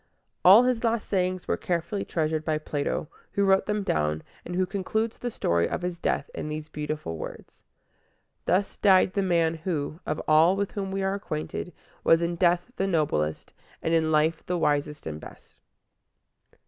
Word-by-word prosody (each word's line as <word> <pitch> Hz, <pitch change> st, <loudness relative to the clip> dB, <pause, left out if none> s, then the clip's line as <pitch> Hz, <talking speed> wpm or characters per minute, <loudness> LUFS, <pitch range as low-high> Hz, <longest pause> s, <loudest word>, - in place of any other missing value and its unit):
All 200 Hz, +7 st, +9 dB
his 250 Hz, -2 st, +1 dB
last 230 Hz, -2 st, 0 dB
sayings 185 Hz, -2 st, -1 dB
were -, -, +1 dB
carefully 175 Hz, +3 st, -2 dB
treasured 155 Hz, -1 st, -1 dB
by 155 Hz, -1 st, 0 dB
Plato, 150 Hz, 0 st, -2 dB, 0.3 s
who 200 Hz, -, +2 dB
wrote 195 Hz, 0 st, +3 dB
them 210 Hz, -1 st, 0 dB
down, 75 Hz, -, 0 dB, 0.2 s
and 175 Hz, -, -6 dB
who 185 Hz, +1 st, +2 dB
concludes 215 Hz, +4 st, -2 dB
the 245 Hz, -, -2 dB
story 85 Hz, -, +1 dB
of -, -, -3 dB
his 180 Hz, -1 st, -3 dB
death 140 Hz, -, 0 dB
in 150 Hz, -, -5 dB
these 150 Hz, 0 st, -5 dB
beautiful 150 Hz, -, -4 dB
words: -, -, -9 dB, 0.8 s
"Thus 185 Hz, +4 st, +1 dB
died 190 Hz, -2 st, +5 dB
the 200 Hz, -, +1 dB
man 170 Hz, -3 st, +2 dB
who, 160 Hz, -2 st, -3 dB
of 155 Hz, -, -1 dB
all 160 Hz, +4 st, +5 dB
with 200 Hz, 0 st, -2 dB
whom 195 Hz, -2 st, -3 dB
we 195 Hz, 0 st, -2 dB
are 190 Hz, 0 st, +1 dB
acquainted, 180 Hz, -2 st, -4 dB, 0.3 s
was 165 Hz, +1 st, +5 dB
in 170 Hz, 0 st, -1 dB
death 175 Hz, +5 st, +2 dB
the 195 Hz, -, 0 dB
noblest, 145 Hz, -, -1 dB, 0.3 s
and 165 Hz, -, 0 dB
in 160 Hz, -1 st, +2 dB
life 160 Hz, +1 st, +2 dB
the 180 Hz, -, 0 dB
wisest 150 Hz, -1 st, 0 dB
and 75 Hz, -1 st, -5 dB
best." -, -, -14 dB
170 Hz, 175 wpm, -27 LUFS, 155-195 Hz, 0.8 s, All